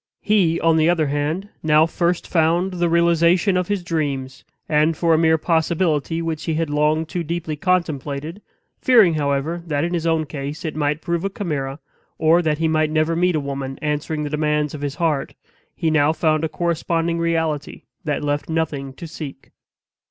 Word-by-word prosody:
He, 185 -6 +2
on 165 0 +3
the 160 +1 +4
other 170 -3 +2
hand, 150 +7 -2
now 155 0 +4
first 170 +1 -1
found 170 +3 +2
the 175 -1 0
realization 170 +3 +3
of 180 -1 0
his 205 -3 -1
dreams, 140 -6 -3 0.2
and 155 +1 +2
for 165 -1 +3
a - - +4
mere 160 -1 +4
possibility 165 -1 0
which 160 -1 -3
he 160 - -1
had 160 -2 -1
long 150 +2 +2
too 175 +2 -4
deeply 165 -1 -3
contemplated, 160 -1 -2 0.4
fearing, 225 - +5
however, 145 +3 -1
that 145 -2 0
in 175 +1 -2
his 170 -1 -1
own 160 -1 +1
case 145 +2 -6
it 155 - -3
might 150 0 -1
prove 170 0 -2
a 195 - 0
chimera, 145 -9 -3 0.4
or 165 +2 +4
that 155 -3 0
he 165 +1 +1
might 155 -1 +2
never 155 +1 +1
meet 180 0 +2
a - - +2
woman 135 -1 -5
answering 150 +1 -2
the 145 - -3
demands 150 -1 0
of 150 - -7
his 145 -1 -3
heart, 155 -4 -1 0.4
he 160 - 0
now 150 -1 +3
found 155 -1 +1
a 160 - 0
corresponding 170 +1 -1
reality 160 -3 -1 0.2
that 150 -2 -2
left 145 +1 -2
nothing 150 -4 -2
to 170 - -9
seek. 145 -4 -9
160 Hz, 185 wpm, -21 LUFS, 150-170 Hz, 0.4 s, fearing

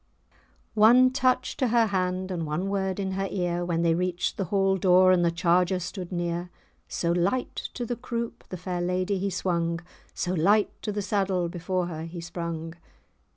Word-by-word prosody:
One 240 +4 +6
touch 255 -1 +1
to 260 - +1
her 230 0 +4
hand, 185 -2 -1
and 170 -2 -2
one 165 +6 -2
word 190 -1 -1
in 190 -1 -2
her 195 +1 -1
ear, 175 -2 -1
When 170 -1 0
they 165 -1 +3
reached 180 +1 -1
the 195 - -2
hall 195 +1 +2
door, 185 0 +5
and 180 -1 +4
the 170 - +4
charger 175 +2 +2
stood 180 0 -6
near; 175 0 -2 0.4
So 170 - -1
light 180 +9 -1
to 245 - -3
the 240 - -2
croupe 235 -1 -5
the 185 - -5
fair 180 0 -3
lady 185 +2 0
he 200 +1 -1
swung, 170 -2 -1 0.4
So 180 - -1
light 200 +5 +3
to 210 - -3
the 205 0 -3
saddle 190 -3 0
before 180 +1 -2
her 160 -2 -5
he 170 +1 -7
sprung! 170 -1 -5
185 Hz, 185 wpm, -26 LUFS, 175-200 Hz, 0.4 s, One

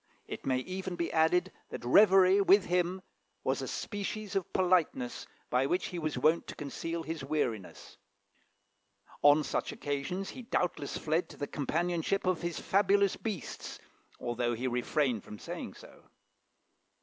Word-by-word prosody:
It - - -7
may 130 -1 +2
even 185 +6 -4
be 170 -1 -2
added, 180 +3 +3 0.2
that - - -7
reverie 190 - +6
with 195 0 +5
him 180 +1 0 0.4
was 135 +1 0
a 130 - -4
species 205 +3 -4
of 195 -3 -1
politeness 175 -9 +1 0.2
by 125 +2 +3
which 180 +5 0
he 180 - -4
was 155 -4 -2
wont 155 +6 +3
to - - -7
conceal 165 +3 -4
his 160 -2 -5
weariness. 125 -9 -3 1.2
On 145 +1 +6
such - - -2
occasions 145 +7 -3
he - - -8
doubtless 180 - -1
fled 160 +3 0
to - - -12
the 145 - -2
companionship 170 +6 -1
of 185 -3 +1
his 170 -1 -3
fabulous 200 0 +3
beasts, 205 - -5 0.4
although 120 0 -1
he 125 +3 -4
refrained 125 -1 0
from 105 - -9
saying - - -7
so. - - -15
165 Hz, 150 wpm, -31 LUFS, 140-185 Hz, 1.2 s, reverie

